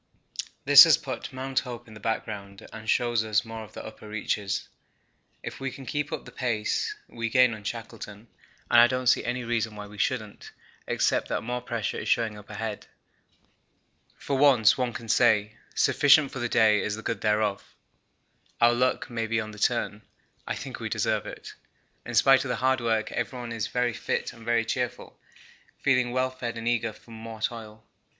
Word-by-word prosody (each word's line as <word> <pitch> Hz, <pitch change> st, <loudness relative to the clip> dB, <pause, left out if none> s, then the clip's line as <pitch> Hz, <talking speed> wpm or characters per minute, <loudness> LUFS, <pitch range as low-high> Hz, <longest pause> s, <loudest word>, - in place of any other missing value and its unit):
This -, -, +11 dB
has -, -, +5 dB
put -, -, -6 dB
Mount 130 Hz, +1 st, -1 dB
Hope 120 Hz, -2 st, -8 dB
in 110 Hz, -, -13 dB
the 110 Hz, -, -11 dB
background 100 Hz, -2 st, -4 dB
and 110 Hz, -1 st, -8 dB
shows 120 Hz, -2 st, +2 dB
us 105 Hz, 0 st, +1 dB
more 115 Hz, 0 st, -7 dB
of 105 Hz, -, -14 dB
the -, -, -8 dB
upper 110 Hz, -1 st, -10 dB
reaches. 105 Hz, -2 st, -2 dB, 0.8 s
If -, -, -7 dB
we 135 Hz, 0 st, -2 dB
can 135 Hz, 0 st, -10 dB
keep 145 Hz, +2 st, -2 dB
up -, -, -5 dB
the -, -, -11 dB
pace, 115 Hz, -4 st, -1 dB
we 115 Hz, 0 st, -4 dB
gain 125 Hz, 0 st, +5 dB
on 110 Hz, -1 st, -9 dB
Shackleton, 115 Hz, -1 st, -7 dB, 0.4 s
and 120 Hz, -, +8 dB
I 120 Hz, -, +7 dB
don't 130 Hz, 0 st, -2 dB
see 120 Hz, -, +4 dB
any 125 Hz, +1 st, -2 dB
reason 115 Hz, -2 st, -1 dB
why 105 Hz, 0 st, -7 dB
we 105 Hz, 0 st, -12 dB
shouldn't, 110 Hz, -2 st, -3 dB, 0.3 s
except -, -, +1 dB
that -, -, -2 dB
more 125 Hz, +2 st, -3 dB
pressure 115 Hz, -3 st, -3 dB
is -, -, -4 dB
showing 115 Hz, -2 st, +1 dB
up 105 Hz, 0 st, -13 dB
ahead. 110 Hz, -2 st, -5 dB, 1.3 s
For 140 Hz, -, -2 dB
once 130 Hz, -6 st, +5 dB
one 125 Hz, -2 st, -1 dB
can 115 Hz, 0 st, -8 dB
say 110 Hz, -1 st, +3 dB, 0.2 s
'sufficient 145 Hz, 0 st, +5 dB
for 135 Hz, -, -6 dB
the 120 Hz, 0 st, -1 dB
day 110 Hz, -3 st, +4 dB
is 105 Hz, -, -2 dB
the 110 Hz, -, -9 dB
good 115 Hz, -, -3 dB
thereof.' 105 Hz, -2 st, 0 dB, 0.8 s
Our 120 Hz, 0 st, +5 dB
luck 125 Hz, +1 st, +1 dB
may 115 Hz, -2 st, -3 dB
be 115 Hz, +1 st, 0 dB
on 110 Hz, -1 st, -5 dB
the 105 Hz, -, -11 dB
turn 110 Hz, -2 st, 0 dB, 0.5 s
I -, -, -2 dB
think -, -, -7 dB
we -, -, -4 dB
deserve -, -, 0 dB
it. -, -, -9 dB, 0.5 s
In -, -, -4 dB
spite 135 Hz, 0 st, +6 dB
of 135 Hz, -, -5 dB
the -, -, 0 dB
hard 130 Hz, 0 st, +1 dB
work 115 Hz, -2 st, 0 dB
everyone 120 Hz, 0 st, -4 dB
is 115 Hz, -2 st, -2 dB
very 125 Hz, 0 st, 0 dB
fit -, -, -2 dB
and 115 Hz, -, -14 dB
very 115 Hz, 0 st, +1 dB
cheerful, -, -, -4 dB, 0.6 s
feeling 125 Hz, -3 st, +2 dB
well 130 Hz, +1 st, 0 dB
fed 120 Hz, -2 st, -5 dB
and 115 Hz, 0 st, -5 dB
eager 115 Hz, -1 st, +1 dB
for 115 Hz, -, -18 dB
more 110 Hz, 0 st, -8 dB
toil. 110 Hz, -1 st, -5 dB
115 Hz, 190 wpm, -27 LUFS, 110-125 Hz, 1.3 s, This